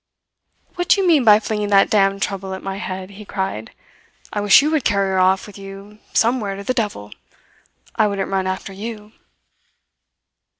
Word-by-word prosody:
"What 355 -1 -4
do - - +5
you 390 - +1
mean 310 -6 +4
by 210 -2 +7
flinging 210 -1 -2
that 200 -1 +4
damned 195 -1 +2
trouble 190 -1 -4
at 190 - -10
my 195 0 -4
head?" 190 -1 -6
he 205 +2 -11
cried. 190 - -4 0.6
"I 205 - -1
wish 205 +6 +6
you 305 - +1
would 310 -4 +1
carry 200 -3 +1
her 190 - +1
off 185 +1 +3
with 205 -1 -12
you 195 +2 -11
some 240 +3 +2
where 200 -3 -4
to 200 - -8
the 255 - -1
devil! 205 - -3 0.9
I 215 - +4
wouldn't 200 -2 -3
run 190 -1 0
after 190 +1 -4
you." 210 +1 -8
200 Hz, 185 wpm, -20 LUFS, 195-215 Hz, 0.9 s, by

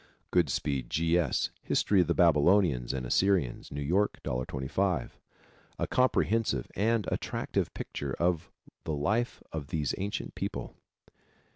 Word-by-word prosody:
Goodspeed, 65 -4 +1
G. 80 +1 +1
S., 90 -2 +1
History 100 -3 +3
of 90 - 0
the 85 - +1
Babylonians 80 -5 +4
and 65 -2 -3
Assyrians. 90 -3 +1
New 70 0 -3
York, 95 +8 +1
$1.25. 65 +9 -1 0.7
A - - 0
comprehensive 115 - +1
and 110 +1 +1
attractive - - -2
picture 70 -2 -4
of 85 -2 0 0.3
the 80 - -2
life 110 - -1
of 75 -3 -5
these 75 -4 -1
ancient 95 -11 -3
people. - - -4
85 Hz, 125 wpm, -30 LUFS, 70-100 Hz, 0.7 s, Babylonians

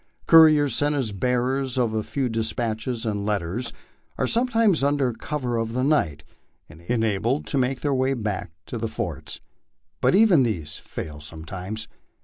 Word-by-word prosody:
Couriers, 155 -5 +7
sent 145 0 +2
as 130 -7 -1
bearers 125 +5 0
of 120 -3 +1
a 110 - 0
few 135 +4 -2
despatches 115 +1 -2
and 105 -2 -2
letters, 105 +3 -2 0.5
are - - +1
sometimes 230 - +2
under 140 -3 +1
cover 125 -1 -3
of 115 0 -2
the 130 +1 0
night 85 - +1 0.4
enabled 110 - -1
to 140 - -1
make 130 +1 0
their 145 -2 0
way 130 +1 +1
back 105 -4 -3 0.2
to 120 - -5
the 115 - -1
forts; - - -5 0.6
but - - +4
even 200 -8 +6
these 80 - -2
fail 75 -1 -7
sometimes. 90 +8 -6
120 Hz, 150 wpm, -24 LUFS, 105-140 Hz, 0.6 s, Couriers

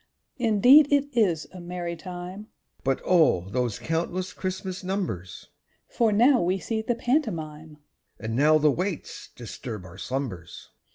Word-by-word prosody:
_) - - -39 0.3
Indeed 250 +5 +6
it 285 -1 +1
is 175 -10 +2
a 185 - -9
merry 175 0 -4
time; 180 +4 -8 0.4
(But 135 0 0
O! 165 - +4
those 125 -3 -1
countless 175 +3 -2
Christmas 185 0 -4
numbers!) 180 - -4 0.4
For 230 -2 +2
now 245 +5 +5
we 180 +2 +1
see 220 +3 -3
the 235 +2 -1
pantomime, 160 - -2 0.4
(_And 110 - -5
now 150 +6 +4
the 150 -1 +4
waits 180 +3 -4
disturb 115 -3 -7
our 95 +1 -12
slumbers. 95 -6 -5
175 Hz, 145 wpm, -26 LUFS, 145-210 Hz, 0.4 s, Indeed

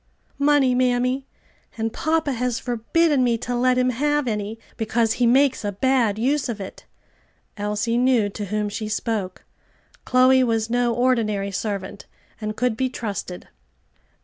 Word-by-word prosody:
"Money, 280 -3 +4
mammy, 250 +1 +1 0.5
and 225 0 -2
papa 315 -1 0
has 250 -1 -1
forbidden 260 +5 +1
me 235 -2 +2
to 245 +2 -4
let 250 +1 +2
him 255 0 +2
have 295 +2 0
any, 210 0 -3 0.2
because 225 0 0
he 245 -1 +1
makes 265 +1 +3
a 205 - -1
bad 235 -1 +1
use 265 +4 0
of 220 -3 -4
it." 195 - -9 0.7
Elsie 210 +3 -1
knew 250 -4 +3
to 205 +1 -6
whom 210 +1 -2
she 210 +1 -4
spoke. 210 -4 -3 0.6
Chloe 255 +1 +4
was 225 -2 0
no 245 0 +2
ordinary 225 -5 0
servant, 200 0 -4 0.3
and 215 0 -4
could 250 -2 +1
be 260 +3 0
trusted. 205 -7 -5
240 Hz, 150 wpm, -23 LUFS, 215-255 Hz, 0.7 s, Money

